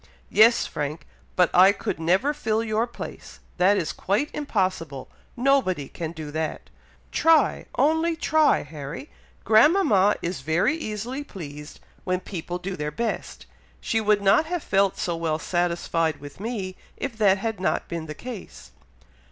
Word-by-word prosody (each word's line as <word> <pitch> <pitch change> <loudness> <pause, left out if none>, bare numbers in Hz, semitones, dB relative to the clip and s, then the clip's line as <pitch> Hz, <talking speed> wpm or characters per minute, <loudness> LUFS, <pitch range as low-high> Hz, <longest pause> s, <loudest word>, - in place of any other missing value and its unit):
"Yes, 230 +3 +6
Frank! 150 +2 -4 0.3
but 180 -2 +3
I 185 +2 +7
could 200 - -4
never 185 - +2
fill 225 -6 -1
your 225 +1 0
place! 240 - -9 0.2
that 190 +3 +4
is 160 - -1
quite 210 +11 -1
impossible! 185 - -2 0.3
Nobody 240 - +2
can 165 -2 -5
do 155 -3 -7
that!" 155 +1 -4 0.4
"Try! 320 -3 +3
only 320 +5 +2
try, 315 -1 +3
Harry! 150 - -8 0.3
grandmama 220 - +5
is 170 -5 -3
very 160 - +1
easily 245 0 -4
pleased 150 - -9 0.2
when 185 -1 0
people 175 -2 -5
do 185 +1 -5
their 150 -3 -3
best. 225 +9 -4 0.3
She 225 -2 0
would 210 -1 +2
not 200 +11 +4
have 350 -1 -3
felt 195 -1 +2
so 175 - -1
well 165 -2 -1
satisfied 170 -1 0
with 145 +3 -11
me, 200 -4 -4 0.2
if 275 -4 -4
that 200 -2 +5
had 220 0 -3
not 185 - -1
been 165 -2 -5
the 155 - -6
case." 240 -6 -9
195 Hz, 150 wpm, -25 LUFS, 165-235 Hz, 0.4 s, I